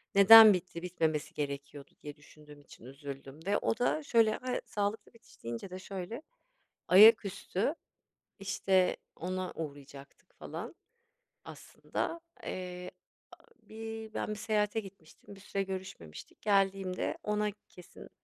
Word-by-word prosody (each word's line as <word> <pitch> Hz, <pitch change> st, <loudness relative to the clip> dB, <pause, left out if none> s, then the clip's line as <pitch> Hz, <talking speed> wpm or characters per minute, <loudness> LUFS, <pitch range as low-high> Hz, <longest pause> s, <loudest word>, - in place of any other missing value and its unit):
Neden 215 Hz, +1 st, +10 dB
bitti, 180 Hz, -2 st, -5 dB
bitmemesi 160 Hz, -4 st, -2 dB
gerekiyordu 140 Hz, 0 st, -6 dB
diye 145 Hz, -1 st, -8 dB
düşündüğüm 150 Hz, 0 st, -17 dB
için 135 Hz, -, -16 dB
üzüldüm 135 Hz, +1 st, -9 dB
ve 200 Hz, -, +2 dB
o 225 Hz, -, -1 dB
da 290 Hz, +5 st, 0 dB
şöyle, 225 Hz, -5 st, +3 dB
a 255 Hz, -1 st, -3 dB
sağlıklı 205 Hz, +2 st, -3 dB
bitiş 230 Hz, -, -21 dB
deyince 115 Hz, +10 st, -6 dB
de 185 Hz, +1 st, -7 dB
şöyle 195 Hz, +5 st, -7 dB, 0.7 s
ayaküstü, 200 Hz, -, +5 dB, 0.6 s
işte, 190 Hz, -1 st, +1 dB, 0.2 s
ona 185 Hz, +1 st, -4 dB
uğrayacaktık 140 Hz, -, -10 dB
falan -, -, -7 dB, 0.7 s
aslında. 335 Hz, 0 st, -5 dB, 0.2 s
Eee, 180 Hz, 0 st, -6 dB, 0.4 s
aaa, -, -, -17 dB, 0.2 s
bir 225 Hz, 0 st, -8 dB
ben -, -, -3 dB
bir 215 Hz, -, -3 dB
seyahate 210 Hz, 0 st, 0 dB
gitmiştim, 195 Hz, -1 st, -13 dB
bir -, -, -15 dB
süre 195 Hz, 0 st, -3 dB
görüşmemiştik. 185 Hz, -, -9 dB
Geldiğimde 195 Hz, -2 st, 0 dB
ona 210 Hz, 0 st, 0 dB, 0.2 s
kesin 180 Hz, -, -14 dB
190 Hz, 120 wpm, -31 LUFS, 155-210 Hz, 0.7 s, Neden